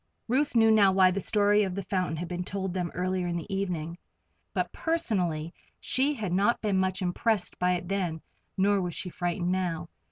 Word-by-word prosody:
Ruth 265 +3 +1
knew 225 -1 +6
now 205 -3 +6
why 190 -1 +5
the 195 - -1
story 205 +1 +3
of 190 -3 -1
the 200 - -3
fountain 185 -3 -1
had 175 +2 -4
been 180 +1 -3
told 190 0 -4
them 180 -2 -2
earlier 185 0 -1
in 170 - -2
the 170 +4 -5
evening, 175 -3 -3 0.5
but - - -1
personally 180 - -1 0.3
she 270 +3 +1
had 205 -8 -3
not 200 +6 +2
been 200 -3 +1
much 185 0 0
impressed 185 +1 0
by 180 0 +2
it 180 0 -3
then, 180 -5 -2 0.3
nor 200 +1 +3
was 175 -2 -3
she 180 - -3
frightened 175 +1 -1
now. 180 -3 -2
185 Hz, 195 wpm, -28 LUFS, 175-205 Hz, 0.5 s, knew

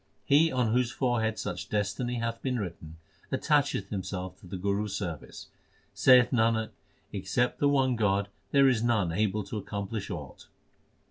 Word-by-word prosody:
He 155 +4 +5
on 120 -4 +1
whose 125 -1 +2
forehead 115 -4 0
such 90 -2 -5
destiny 105 +4 -1
hath 115 -1 -3
been 130 -2 -1
written, 85 -5 -7 0.3
attacheth 145 -10 +1
himself 95 -2 -4
to 95 - -14
the 95 - -5
Guru 100 +3 0
s 105 - -5
service. 85 -7 -5 0.5
Saith 125 -2 +6
Nanak, 110 -2 +2 0.4
except 125 0 -1
the 145 - +3
one 135 -3 +2
God 100 -2 +1 0.2
there 140 -1 +5
is 125 -4 +3
none 110 -7 +1
able 105 +3 0
to 105 - -5
accomplish 100 +1 -5
aught. 75 -8 -8
110 Hz, 155 wpm, -29 LUFS, 100-125 Hz, 0.5 s, Saith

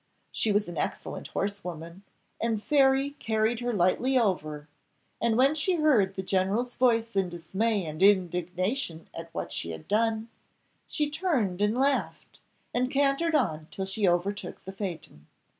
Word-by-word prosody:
She 220 - +1
was 205 +1 +2
an 170 -3 -5
excellent - - -4
horse 200 0 -3
woman, 170 +1 -7 0.4
and 225 -2 0
Fairy 275 -1 +3
carried 220 0 0
her 245 0 -1
lightly 225 +7 +2
over; 155 -10 0 0.5
and 230 -1 +2
when 270 +3 +5
she 315 +4 +1
heard 250 - +3
the 190 - -3
general's 195 +6 0
voice 230 -3 +2
in 190 -2 +1
dismay 190 +5 -1
and 155 +1 -6
indignation 180 - +1
at 165 0 -8
what 170 - -5
she 85 - -4
had 80 -1 -8
done, 225 +1 +1 0.6
she 300 - 0
turned 290 - -1
and 210 +3 +2
laughed, 275 +1 -1 0.3
and 250 +1 +1
cantered 280 +4 +2
on 155 - 0
till 190 - -4
she 195 +1 0
overtook 180 +1 -2
the 190 - -6
phaeton. 175 - -7
205 Hz, 155 wpm, -28 LUFS, 180-250 Hz, 0.6 s, when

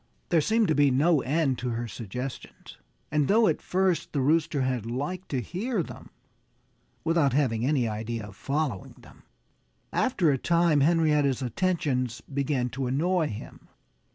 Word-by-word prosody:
There 165 -2 +4
seemed 220 +6 +2
to - - +4
be 145 -1 +4
no 145 +3 +3
end 140 -2 0
to 125 - -2
her 120 0 -3
suggestions. 125 +4 -7 0.3
And 150 -2 +2
though 220 +1 +4
at - - 0
first 185 -2 0
the 145 - 0
Rooster 155 +1 +2
had 130 -3 -1
liked 150 +10 -4
to 135 - -1
hear 195 - -2
them - - -11 0.9
(without 160 -5 +2
having 125 -5 +1
any 135 -5 +2
idea 110 +1 -4
of 105 -1 -12
following 140 -3 -3
them) - - -18 0.7
after 190 - +2
a 135 - 0
time 170 -1 +3
Henrietta's 150 -3 +2
attentions 130 - -1
began 135 -2 -1
to 130 +1 -3
annoy 160 +5 +1
him. 105 - -9
145 Hz, 155 wpm, -27 LUFS, 125-165 Hz, 0.9 s, There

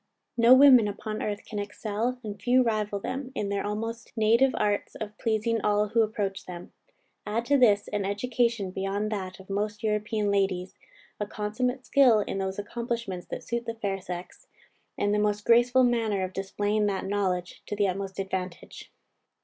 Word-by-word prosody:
_" - - -50 0.3
No 235 +2 +7
women 260 -5 +7
upon 215 +1 -5
earth 205 0 -3
can 210 - -5
excel, 215 +4 -3
and 205 -2 -7
few 250 +3 +4
rival 215 -3 -1
them, 255 +4 -5
in 200 - -2
their 200 0 -1
almost 225 +3 -4
native 230 +5 +4
arts 205 -1 -1
of 210 -1 -6
pleasing 225 0 0
all 210 0 +2
who 230 +2 +3
approach 205 -3 -2
them. 175 -1 -9 0.5
Add 225 +3 -1
to 285 +2 +3
this, 205 -5 +4
an 205 -1 -1
education 225 0 0
beyond 195 +3 -2
that 190 -3 -4
of 190 - -13
most 210 +2 -3
European 210 -1 0
ladies, 190 -2 0 0.5
a 210 - -2
consummate 245 +5 -2
skill 250 -6 +5
in 195 - -3
those 190 0 -3
accomplishments 225 -3 -4
that - - -6
suit 235 0 -3
the 230 - -3
fair 200 -3 -3
sex, 180 - -8 0.5
and 205 0 +1
the 210 - +2
most 210 0 0
graceful 240 +2 +5
manner 225 -5 +1
of 185 0 -4
displaying 205 +2 0
that 195 -2 -2
knowledge 190 -3 -2
to 210 - -3
the 205 -1 +2
utmost 190 +1 -4
advantage. 190 -3 -5
210 Hz, 175 wpm, -27 LUFS, 200-230 Hz, 0.5 s, No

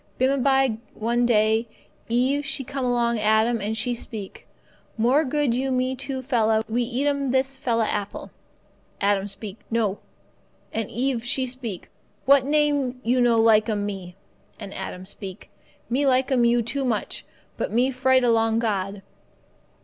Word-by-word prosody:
Bimeby, 265 -2 +2 0.2
one 235 +2 +1
day, 220 0 +3 0.4
Eve 260 +5 +1
she 275 -1 -2
come 270 +1 -4
along 235 -2 +1
Adam, 220 +2 +2
and 215 +2 -2
she 245 +2 0
speak, 220 -4 -8 0.5
'More 250 +7 +3
good 290 -2 0
you 265 +2 -1
me 255 0 0
two 265 0 -4
fella 225 -4 +2
we 235 +2 0
eat 245 +3 -1
'm 280 -2 0
this 265 +1 +1
fella 235 -4 0
apple.' 200 -1 -4 0.7
Adam 200 -1 +1
he - - -5
speak, 200 +1 -8
'No,' 220 -3 0 0.7
and 225 -2 -2
Eve 245 +1 -1
she 260 +2 +1
speak, 245 -7 -7 0.3
'What 275 -1 +5
name 290 -4 +1
you 250 +2 +2
no 235 -2 +4
like 220 -1 +4
'm 205 -2 -1
me?' 190 -3 -6 0.4
And 195 - -8
Adam 185 -1 -6
he - - -12
speak, 195 0 -8 0.4
'Me 270 +4 +1
like 260 +1 +2
'm 245 -2 +3
you 235 0 +3
too 270 +5 -2
much, 235 -5 -2 0.3
but - - -3
me 250 +4 +2
fright 260 0 +3
along 225 -1 +3
God. 200 -3 -2
240 Hz, 160 wpm, -24 LUFS, 220-260 Hz, 0.7 s, What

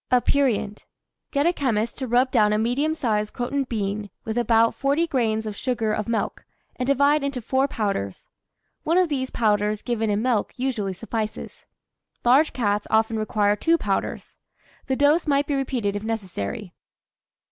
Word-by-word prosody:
APERIENT. 250 -5 +1 0.4
Get 285 0 +1
a 345 - +3
chemist 235 -7 -1
to 260 - -3
rub 250 +2 +2
down 210 -4 +4
a - - +2
medium 260 +8 0
size 215 -7 0
croton 270 +4 -2
bean 205 -3 -3 0.2
with 220 - -3
about 230 -1 +3
40 285 +5 +1
grains 225 -8 0
of 210 -1 -4
sugar 230 -3 -1
of 215 -1 -2
milk, 230 -1 -2 0.3
and 250 - -3
divide 280 +2 +3
into 280 -2 -2
four 265 +4 +1
powders. 200 - -3 0.6
One 330 +3 +1
of 365 -2 +3
these 260 -3 -1
powders 210 -2 +1
given 225 -2 -1
in 205 +1 0
milk 245 -3 0
usually 240 -7 -1
suffices. 215 +2 -5 0.6
Large 270 +6 +5
cats 205 -4 -1
often 220 0 +2
require 210 -1 +1
two 330 +9 +2
powders. - - -3 0.5
The 265 - +1
dose 295 +5 +3
might 285 0 +2
be 290 - -2
repeated 250 -7 -1
if 205 - -3
necessary. 190 - -4
235 Hz, 160 wpm, -24 LUFS, 210-275 Hz, 0.6 s, Large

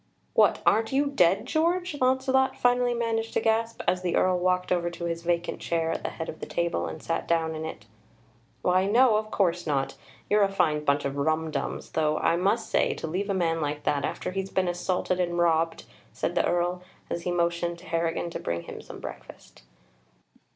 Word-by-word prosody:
"What, - - +4
aren't 225 0 +3
you 275 +2 +2
dead, 195 -8 +3
George?" 340 +1 0
Launcelot 265 +1 +2
finally 245 0 +2
managed 225 -1 -1
to - - +4
gasp, 225 +1 0
as 180 - +2
the 180 -2 -1
Earl 185 -1 +3
walked 180 0 +1
over 175 -1 +1
to 170 0 -6
his 170 0 -2
vacant 175 0 -1
chair 165 -1 -1
at - - -3
the - - -1
head 160 - -6
of 160 - -7
the - - -6
table 170 0 -1
and 155 - -7
sat 165 - -2
down 165 -1 +1
in 160 0 -5
it. 160 - -7 0.8
"Why, 185 +1 +3
no; 230 +1 +5
of 215 0 -3
course 175 -5 0
not. 135 -2 0 0.3
You're 210 +1 +3
a 200 - +4
fine 150 -6 +1
bunch 145 0 +1
of 140 0 -2
rumdums, 155 0 -1
though, 155 -1 +1
I - - +2
must 195 +6 0
say, - - +2
to - - -5
leave 185 +6 -2
a 200 - +1
man 165 -3 +1
like 150 0 -2
that, 140 -1 0
after - - -3
he's 195 0 -3
been 190 -1 0
assaulted 180 +1 -1
and 175 -1 0
robbed!" 165 -1 +2 0.3
said - - -2
the - - +2
Earl, 175 +1 0 0.3
as 170 - -2
he 180 - -2
motioned 170 0 0
to 175 - -15
Harrigan 165 0 -1
to - - -4
bring 85 0 -3
him - - -8
some - - -10
breakfast. - - -10
175 Hz, 205 wpm, -27 LUFS, 165-210 Hz, 0.8 s, no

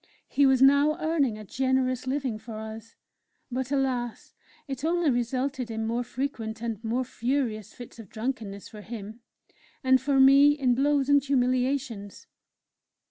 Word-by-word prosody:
He 280 -1 +3
was 265 -1 +4
now 285 +3 +5
earning 310 -8 0
a 215 - -9
generous 260 +1 0
living 260 -5 -2
for 220 0 -8
us; 220 +1 -8 0.6
but 260 +1 -3
alas! 255 -4 -2 0.3
it 270 0 -5
only 335 -2 +2
resulted 255 +1 -2
in 220 0 -3
more 235 +2 -1
frequent 235 -4 -4
and 230 -2 -4
more 235 +3 0
furious 235 -4 -2
fits 245 -1 -12
of 215 -5 -11
drunkenness 220 -4 -5
for 210 -2 -11
him 220 0 -8 0.6
and 260 0 +4
for 275 0 +1
me 275 +2 +7
in 255 -4 +2
blows 280 +1 +2
and 285 -1 +4
humiliations. 255 -5 -1
255 Hz, 145 wpm, -27 LUFS, 225-275 Hz, 0.6 s, me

